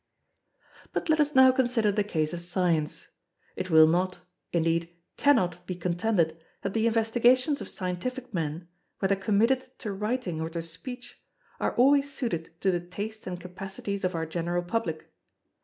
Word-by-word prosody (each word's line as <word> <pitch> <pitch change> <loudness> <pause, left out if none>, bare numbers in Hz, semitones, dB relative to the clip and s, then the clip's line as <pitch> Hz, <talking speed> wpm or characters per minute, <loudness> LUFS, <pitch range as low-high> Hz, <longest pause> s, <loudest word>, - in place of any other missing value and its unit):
But - - -2
let 315 0 +4
us 295 -1 +2
now 260 0 +8
consider 245 -4 +2
the 205 +1 +1
case 160 -5 -1
of 170 - -4
Science. 175 -3 -1 0.5
It 185 0 -4
will 160 -1 +8
not, 180 +3 +1 0.3
indeed 165 0 +1 0.3
cannot, 180 - +2
be 185 - -3
contended 175 -1 0 0.2
that 195 - -2
the 225 0 +2
investigations 240 +5 +3
of - - -5
scientific 240 +7 -4
men, 165 0 -3 0.3
whether 195 0 +2
committed 230 +7 +1
to 210 -5 -4
writing 210 -5 -2
or 160 - -2
to 165 0 -4
speech, 245 +10 -7 0.4
are - - -1
always 280 +3 +4
suited 230 - -3
to 190 - +3
the 175 - 0
taste 205 +5 -7
and 180 -1 -4
capacities 195 +2 -6
of 185 -1 0
our 165 0 -1
general 175 +2 -2
public. 175 -4 -3
190 Hz, 155 wpm, -28 LUFS, 170-235 Hz, 0.5 s, now